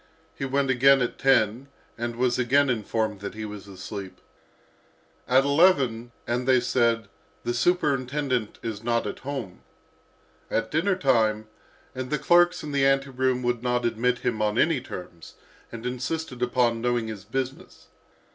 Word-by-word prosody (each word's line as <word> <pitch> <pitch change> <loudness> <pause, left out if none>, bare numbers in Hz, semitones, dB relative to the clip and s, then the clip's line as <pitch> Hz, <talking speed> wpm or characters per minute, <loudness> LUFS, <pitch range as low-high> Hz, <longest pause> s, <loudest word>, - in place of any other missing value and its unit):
He 135 - -4
went 135 0 +1
again 135 +2 +5
at 120 - -4
ten 125 -1 +2 0.3
and 120 0 -4
was 125 +1 +1
again 135 +2 +3
informed 110 -2 -2
that 100 +1 -7
he 110 0 -5
was 105 -1 -8
asleep. 95 0 -8 1.1
At 130 +2 +4
eleven, 140 -6 +3
and 125 +2 -2
they 130 -1 +5
said, 115 -3 +1 0.4
"The 120 - -1
superintendent 135 - 0
is 110 -2 -5
not 115 0 0
at 105 - -5
home." 130 -9 -6 0.9
At 115 - -1
dinner 185 +6 +1
time, 110 -8 +1 0.4
and 130 0 -5
the 150 - 0
clerks 175 +3 +3
in 150 - -5
the 140 -1 +1
ante 135 0 +2
room 130 -1 0
would 120 -1 0
not 125 -1 0
admit 120 +2 +1
him 110 -3 0
on 105 +1 0
any 155 -3 +2
terms, 85 -8 -10 0.4
and 115 0 -8
insisted 125 +2 -4
upon 120 -2 +1
knowing 120 -1 0
his 105 -3 -7
business. 130 +4 -5
125 Hz, 155 wpm, -25 LUFS, 115-135 Hz, 1.1 s, again